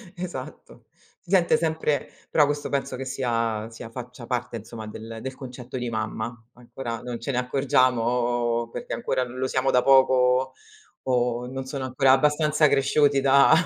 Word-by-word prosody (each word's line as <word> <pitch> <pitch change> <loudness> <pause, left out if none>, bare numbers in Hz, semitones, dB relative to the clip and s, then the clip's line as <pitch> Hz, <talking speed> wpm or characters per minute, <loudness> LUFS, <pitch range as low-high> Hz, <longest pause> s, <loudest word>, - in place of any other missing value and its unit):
Esatto, 175 -8 -8 0.3
si - - -23
sente 180 -3 +4
sempre 160 -2 -1 0.2
però 150 - +4
questo, 145 0 -2
penso 135 -2 -2
che 135 +1 -5
sia 115 -4 -1
sia 115 0 -10
faccia 125 0 -9
parte, 125 -1 -3
insomma, 110 0 -9
del 115 +4 -7
concetto 125 -1 -8
di 120 -1 -3
mamma. 110 +1 -3 0.2
Ancora 120 -1 -7
non 120 -1 -5
ce 130 - -3
ne 125 - -2
accorgiamo, 120 -2 +1
perché 245 - -6
ancora 180 - -1
lo 130 +1 -3
siamo 130 +1 +1
da 125 - +3
poco, 130 -1 +4 0.5
o 125 -1 0
non 135 +1 -5
sono 135 0 -4
ancora 130 +1 +3
abbastanza 150 +2 +3
cresciuti 140 +1 +3
da 140 +1 +5
130 Hz, 155 wpm, -25 LUFS, 120-135 Hz, 0.5 s, da